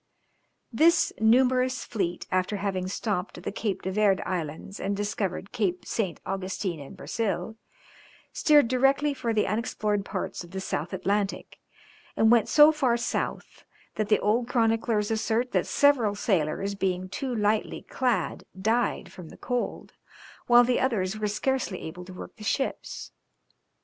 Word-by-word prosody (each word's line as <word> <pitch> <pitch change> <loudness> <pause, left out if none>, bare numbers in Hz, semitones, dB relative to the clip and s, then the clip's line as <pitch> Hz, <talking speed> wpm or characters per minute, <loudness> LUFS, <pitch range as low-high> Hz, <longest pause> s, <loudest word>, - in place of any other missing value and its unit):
This 325 +8 +4
numerous 255 +3 +3
fleet, 180 -6 -3
after 185 +3 0
having 190 -2 -2
stopped 195 -1 -3
at 175 - -10
the - - -3
Cape 205 -1 -3
de 190 - -2
Verd 200 -1 +3
Islands 170 +2 -4
and 200 +1 -2
discovered 200 -2 -3
Cape 195 -7 -1
St. 195 -7 -2
Augustine 190 -2 -3
in 140 +6 -10
Brazil, 220 +3 -3 0.8
steered 295 -5 +5
directly 270 +4 +2
for 240 -4 -2
the 215 -1 +2
unexplored 210 -1 -1
parts 190 -2 -4
of 175 - -13
the 190 +2 -5
South 170 -3 -3
Atlantic, 195 +2 -2 0.6
and 220 +1 +5
went 235 -2 +4
so 300 +1 +8
far 260 -6 +1
south 235 - -3 0.3
that 215 -1 -2
the 210 - +5
old 230 +3 +1
chroniclers 225 -3 +1
assert 225 +3 0
that - - +1
several 255 -8 +3
sailors 195 -1 0
being 185 -2 -1
too 250 +6 -4
lightly 210 0 0
clad 245 -9 -1 0.2
died 225 +5 0
from 175 -4 -11
cold, 245 -1 -3 0.5
while 240 0 +7
the 245 0 +1
others 215 -5 0
were 210 - 0
scarcely 215 -2 -1
able 175 +3 -7
to 185 - -10
work - - -10
the 215 - -10
ships. 270 +6 -3
210 Hz, 150 wpm, -27 LUFS, 190-240 Hz, 0.8 s, so